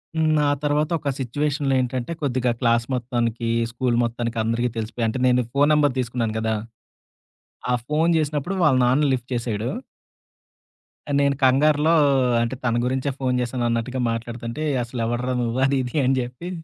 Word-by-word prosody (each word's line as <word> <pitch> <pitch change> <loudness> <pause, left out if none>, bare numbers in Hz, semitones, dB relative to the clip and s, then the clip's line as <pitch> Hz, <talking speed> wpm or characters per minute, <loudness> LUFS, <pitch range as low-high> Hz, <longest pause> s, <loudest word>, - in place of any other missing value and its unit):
హ్మ్. 155 -1 +2
ఆ - - +3
తర్వాతొక 150 +1 0
సిచ్యువేషన్‌లో 145 +2 -1
ఏంటంటే, 125 +2 -3
కొద్దిగా 130 -3 0
క్లాస్ 115 -2 +2
మొత్తానికీ, 120 -2 -2 0.2
స్కూలు 120 0 0
మొత్తానికి, 115 0 -3
అందరికీ 115 +2 0
తెలిసిపోయా. 115 +1 -2
అంటే, 120 - -3
నేనీ 125 0 +3
ఫోను 145 +1 +3
నంబర్ 145 -3 +3
తీసుకున్నాను 115 -3 -2
గదా! 110 0 0 1.2
ఆ - - +3
ఫోను 160 +3 +2
జేసినప్పుడు 155 +4 -1
వాళ్ళ 135 -5 +4
నాన్న 130 +5 +3
లిఫ్ట్ 125 -1 -4
చేశాడు. 115 -1 -2 1.4
ఆహ్, 145 - +1
నేను 140 0 +2
కంగారులో 150 +4 +4 0.5
అంటే, 115 +2 -1
తన 120 -2 +1
గురించే 130 +2 -1
ఫోను 130 -2 0
జేశానన్నట్టుగా 120 0 -1
మాట్లాడతంటే, 115 +4 -5 0.2
"అసలెవడ్రా 120 +1 -2
నువ్వు," 120 +1 -1
అది 140 0 +1
ఇది 125 +2 -7
అని 135 +1 +3
జెప్పి 125 +8 -7
125 Hz, 145 wpm, -23 LUFS, 120-145 Hz, 1.4 s, వాళ్ళ